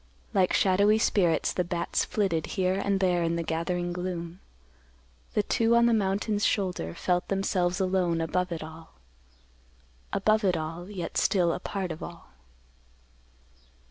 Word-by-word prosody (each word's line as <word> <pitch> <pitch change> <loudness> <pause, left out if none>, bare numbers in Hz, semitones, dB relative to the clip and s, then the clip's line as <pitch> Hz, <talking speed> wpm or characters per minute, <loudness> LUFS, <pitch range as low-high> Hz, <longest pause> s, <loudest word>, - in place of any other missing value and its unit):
Like 190 -3 +3
shadowy 200 +3 +4
spirits, 175 -7 +2
the 180 - 0
bats 175 0 -1
flitted 185 -7 -1
here 185 -1 +2
and 195 0 0
there 180 -2 +2
in 165 0 0
the 170 - -1
gathering 175 +2 -2
gloom. 175 -1 -5 1.0
The 210 - +3
two 230 +2 +2
on 235 0 +5
the 235 - +4
mountain's 205 0 0
shoulder 180 - 0
felt 180 -1 0
themselves 185 -2 0
alone 185 -3 +1
above 180 +3 -1
it 165 -2 -4
all; 160 +1 -12 1.2
above 215 0 +2
it 185 -3 +2
all, 165 +4 -5
yet 185 -5 -5
still 175 -4 +2
a - - -4
part 190 -1 -4
of 160 - -7
all. 170 -1 -9
180 Hz, 145 wpm, -27 LUFS, 170-195 Hz, 1.2 s, on